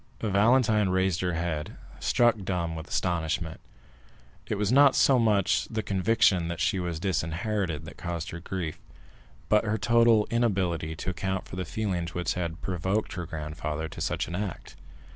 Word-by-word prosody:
Valentine 105 0 +3
raised 95 -1 +1
her 90 -1 0
head, 80 -3 -3 0.2
struck 120 -2 +3
dumb 85 -3 -2
with 80 0 -7
astonishment. 80 -2 -2 0.9
It - - -1
was 105 +1 0
not 140 +1 +6
so 135 -2 +5
much 105 -4 +2
the 110 -1 -2
conviction 95 -3 +2
that 85 0 -4
she 90 +3 +1
was 85 -3 -3
disinherited 90 -1 -1
that 85 - -10
caused 85 0 -4
her 85 - -6
grief, 85 -3 -4 0.7
but 105 +1 +4
her 110 0 0
total 115 0 +4
inability 95 -9 0
to 90 - -3
account 95 +1 -3
for - - -8
the 90 0 -3
feelings 90 -4 -3
which 90 0 0
had 85 -2 -4
provoked 95 +4 -1
her 90 -2 -5
grandfather 75 0 -4
to - - -8
such - - -1
an 85 - -7
act. 95 -1 -5
90 Hz, 160 wpm, -27 LUFS, 85-105 Hz, 0.9 s, not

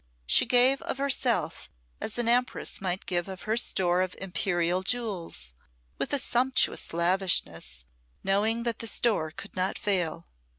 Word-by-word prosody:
She - - +4
gave 255 +2 +5
of - - -4
herself 255 - 0 0.3
as 220 - -4
an 240 -1 0
empress 245 -2 0
might 185 0 -3
give 175 -1 -1
of 190 -1 -8
her 215 +1 0
store 180 -6 +2
of 185 -1 -2
imperial 180 -1 -1
jewels, 190 - -1 0.5
with 285 - 0
sumptuous 255 +1 +2
lavishness, 165 - 0 0.4
knowing 215 +4 +1
that 235 -2 -2
the 230 - -4
store 210 -7 +2
could 200 +6 -10
not 185 +1 -1
fail. 185 -6 -1
195 Hz, 140 wpm, -27 LUFS, 175-235 Hz, 0.5 s, gave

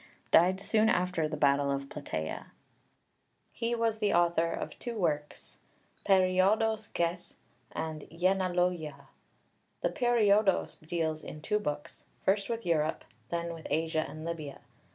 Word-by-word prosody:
died 185 +3 +5
soon 220 +2 +3
after 180 -4 +1
the 155 - -4
battle 140 -1 +3
of 140 0 -2
Plataea. 80 - -5 1.0
He 235 0 -1
was 225 -1 0
the 210 -2 +2
author 170 -1 +3
of - - -5
two 240 -2 -5
works 150 -6 -2 0.5
(1) 195 -2 +6
περίοδος 205 +4 +2
γῆς; 170 +1 -2 0.4
and 155 -1 -4
(2) 165 - -14
γενεηλογίαι. 180 -5 0 0.8
The - - +2
Periodos 215 -6 +3
deals 160 -2 -1
in 150 - -8
two 210 +7 0
books, 150 -6 -5 0.2
first 195 +2 +2
with 230 0 -3
Europe, 160 -2 0 0.2
then 170 0 -2
with 165 -1 -8
Asia 160 +1 +1
and 155 +1 -8
Libya. 155 -4 -5
170 Hz, 135 wpm, -30 LUFS, 155-200 Hz, 1.0 s, 1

